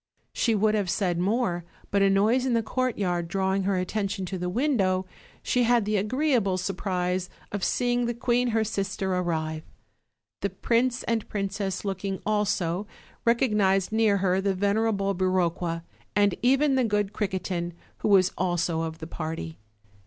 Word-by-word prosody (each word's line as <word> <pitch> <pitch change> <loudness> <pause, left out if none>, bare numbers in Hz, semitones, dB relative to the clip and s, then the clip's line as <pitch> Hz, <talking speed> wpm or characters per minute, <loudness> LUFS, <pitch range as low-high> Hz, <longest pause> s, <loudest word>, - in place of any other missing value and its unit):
She 230 -2 +1
would 215 +1 +3
have 205 -4 0
said 175 -1 0
more, 185 -2 0 0.3
but 200 - +2
a 195 - +5
noise 220 +7 +3
in 245 - +2
the 230 - +2
courtyard 205 -8 -1
drawing 190 +1 0
her 195 -1 +1
attention 195 +1 -2
to 185 +1 -4
the 180 0 -2
window, 195 -6 +1 0.4
she 250 - +1
had 240 -2 +3
the 210 +1 0
agreeable 225 -2 +1
surprise 185 -1 -2 0.2
of 205 -2 -3
seeing 245 -1 +1
the 240 - -2
queen 245 +1 +1
her 225 -2 +2
sister 195 -3 -2
arrive. 160 -3 -1 0.8
The 200 - -1
prince 235 +6 0
and 230 -2 -1
princess 195 -1 -3
looking 195 0 -3
also, 205 -3 0 0.4
recognized 210 -6 +2
near 220 -2 +3
her 190 0 +1
the 195 -1 0
venerable 200 0 +1
Biroqua, 175 -2 0 0.3
and 205 -1 +4
even 270 +3 +3
the 260 -1 +3
good 205 -2 0
Criquetin, 185 -4 -2 0.3
who - - -1
was 190 -3 +5
also 175 -2 0
of 160 -1 -4
the 160 - -7
party. 160 -2 -5
195 Hz, 155 wpm, -26 LUFS, 185-220 Hz, 0.8 s, a